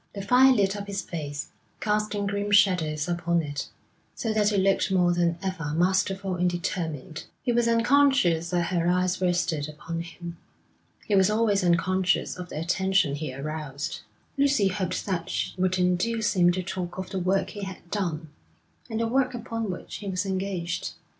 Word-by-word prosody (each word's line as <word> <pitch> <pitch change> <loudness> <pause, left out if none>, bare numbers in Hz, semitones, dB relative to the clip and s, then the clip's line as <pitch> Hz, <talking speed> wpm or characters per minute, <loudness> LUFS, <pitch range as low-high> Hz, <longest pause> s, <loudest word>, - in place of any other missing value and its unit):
The 200 - -4
fire 255 +5 +6
lit 200 -5 +2
up 200 0 -6
his 200 -2 -3
face, 145 -4 -5 0.3
casting 210 -1 0
grim 205 +1 -2
shadows 180 -7 +3
upon 170 -1 0
it, 145 -1 -5 0.5
so 225 -2 -2
that 210 -1 +3
it 205 - +1
looked 195 +1 +2
more 180 -2 +3
than 170 -1 +1
ever 165 -6 -3
masterful 190 +2 +1
and 180 0 +2
determined. 160 -4 -4 0.2
He 250 - +1
was 235 0 +2
unconscious 230 - +3
that 175 -1 0
her 170 -1 +1
eyes 180 +1 +1
rested 170 -4 0
upon 165 +2 -5
him. 170 0 -8 0.7
He 210 - -2
was 190 0 +5
always 210 -2 +2
unconscious 180 +2 +2
of 180 -1 -7
the - - -5
attention 190 -1 +1
he 145 -1 -4
aroused. 145 +1 -5 0.4
Lucy 275 -8 +3
hoped 185 -2 -2
that 185 -2 -2
she - - -2
would 185 0 +2
induce 210 +5 +1
him 175 -1 +5
to 185 +1 -2
talk 180 -1 -5
of 190 0 -5
the 190 - -2
work 185 +2 +1
he 205 - -7
had 190 -3 -8
done, 165 -6 -2 0.6
and 220 - -2
the 230 - +1
work 255 +1 +1
upon 230 -2 -4
which 180 - -6
he 205 - -8
was 190 +1 -1
engaged. 185 -3 -2
185 Hz, 175 wpm, -26 LUFS, 170-205 Hz, 0.7 s, fire